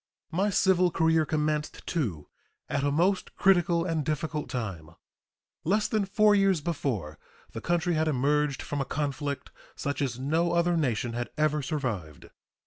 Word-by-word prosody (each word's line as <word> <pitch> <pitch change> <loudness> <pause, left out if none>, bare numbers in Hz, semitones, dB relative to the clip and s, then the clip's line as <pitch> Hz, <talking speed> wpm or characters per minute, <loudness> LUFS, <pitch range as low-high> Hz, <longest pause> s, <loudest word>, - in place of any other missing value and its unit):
My 190 +5 +1
civil 185 -2 +3
career 160 -1 +2
commenced, 150 -1 -1
too, 110 - -2 0.4
at 140 - -1
a 145 - +2
most 180 +6 +1
critical 175 -3 +3
and 165 -4 -1
difficult 155 +1 -2
time. 95 -11 -4 0.7
Less 205 +5 +2
than 215 -2 0
four 210 +1 +4
years 195 -3 +3
before, 130 - -3 0.3
the 115 - -6
country 175 +3 +1
had 160 0 +1
emerged 145 0 +1
from 145 -1 -3
a - - -1
conflict 145 -1 -3 0.2
such 140 0 -3
as 130 -4 -1
no 160 +6 +1
other 170 0 +2
nation 120 -6 0
had 120 0 -3
ever 150 0 +2
survived. 120 - -4
150 Hz, 150 wpm, -28 LUFS, 135-175 Hz, 0.7 s, four